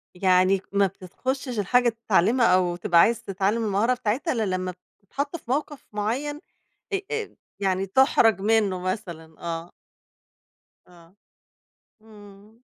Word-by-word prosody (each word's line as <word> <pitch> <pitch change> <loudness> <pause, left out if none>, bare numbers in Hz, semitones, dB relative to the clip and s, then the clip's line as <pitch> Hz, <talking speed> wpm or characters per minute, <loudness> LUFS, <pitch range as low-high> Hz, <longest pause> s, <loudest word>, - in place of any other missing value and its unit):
يعني 185 +1 +3
ك - - -25
ما 200 0 +4
بتتخشش 245 +7 -5
الحاجة 245 +5 +3
تتعلمها 230 +1 +2
أو 180 -1 +3
تبقى 175 -1 +2
عايز 230 +6 +3
تتعلم 200 +2 -1
المهارة 210 +4 +2
بتاعتها، 250 +6 -1
الّا 230 -3 -1
لمّا 185 0 -3
ب - - -18 0.2
تتحط 280 - -4
في 255 -7 -7
موقف 290 +1 -3
معيّن 250 +8 -2 0.5
آآ، 395 - 0
آآ، 445 -1 -4 0.2
يعني 190 -1 0
تُحرج 225 -1 +3
منُّه 205 -3 +2
مثلًا، 170 -4 -6
آه. 170 0 -5 1.2
آه. 175 0 -19 0.9
إمم. 210 +1 -17
205 Hz, 130 wpm, -25 LUFS, 185-240 Hz, 1.2 s, ما